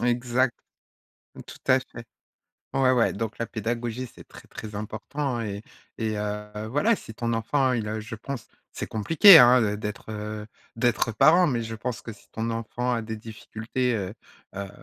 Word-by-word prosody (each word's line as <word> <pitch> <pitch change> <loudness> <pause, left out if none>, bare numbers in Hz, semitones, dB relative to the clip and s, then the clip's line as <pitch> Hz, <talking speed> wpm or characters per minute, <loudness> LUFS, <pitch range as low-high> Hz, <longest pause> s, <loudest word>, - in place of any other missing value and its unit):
Exact, 120 +1 +1 0.9
tout - - -11
à - - +6
fait. - - -10 0.7
Ouais, 130 -1 +3
ouais 120 -2 +3
donc 110 +1 -4
la 115 - -2
pédagogie 120 +3 -3
c'est - - -15
très, - - -14
très 105 -1 -8
important 120 +5 -3
et 100 -1 -4 0.4
et 110 -2 -1
heu, 105 0 -4
voilà, 205 - +3
si 110 - -10
ton 115 +1 -2
enfant 130 +4 +1
il 115 -3 -2
a, 110 +1 -3
je 110 +1 -7
pense 120 +2 -6 0.2
c'est - - -5
compliqué 165 - +8
hein, 120 -5 +6
d'être, 105 0 -6
heu, 105 0 -5 0.3
d'être 115 -1 +1
parent, 170 - +6
mais 120 -6 0
je 115 0 -5
pense 115 +2 -4
que 115 - -8
si 100 - -18
ton 115 +1 -2
enfant 115 +2 -2
a 115 - -2
des 110 0 -5
difficultés, 115 +3 -3
heu, 100 -2 -3 0.4
heu, 100 0 -5
115 Hz, 175 wpm, -26 LUFS, 110-125 Hz, 0.9 s, compliqué